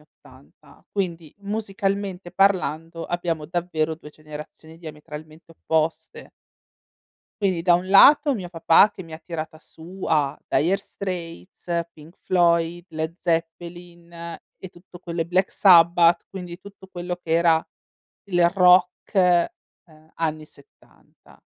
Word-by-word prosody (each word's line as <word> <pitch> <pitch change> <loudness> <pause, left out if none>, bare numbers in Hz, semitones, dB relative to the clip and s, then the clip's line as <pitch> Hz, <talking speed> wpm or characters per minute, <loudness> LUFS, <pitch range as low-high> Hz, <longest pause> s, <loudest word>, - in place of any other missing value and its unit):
'80. 150 - -21
Quindi, 170 -6 -4
musicalmente 200 -3 -3
parlando, 170 -4 0
abbiamo 170 -3 -3
davvero 160 -2 -2
2 150 -1 -13
generazioni 155 +1 -12
diametralmente 155 0 -11
opposte. 160 0 -3 1.1
Quindi 185 -4 0
da 175 0 +4
un 180 +2 +1
lato 285 +8 +6
mio 185 -6 -6
papà 165 +4 +4
che 190 - -10
mi 165 -2 -10
ha - - -9
tirata 160 -2 -7
su 175 +4 -11
a 150 -2 +1
Dire 175 +6 +1
Straits, 175 -3 -6
Pink 160 +2 -17
Floyd, 170 -1 +1
Led 160 +1 -4
Zeppelin 170 +1 -4
e 170 +2 -10
tutto 175 0 -16
quello 170 -1 -3
i - - -7
Black 180 +3 0
Sabbath, 170 -2 +5
quindi 180 -2 -9
tutto 200 0 -14
quello 175 0 -4
che 175 -2 -11
era 165 -1 +3 0.6
il 175 -2 +4
rock, 180 +1 +3
ehm, 170 -3 -1
anni 155 -1 -2
'70. 430 - -23
170 Hz, 125 wpm, -23 LUFS, 160-185 Hz, 1.1 s, lato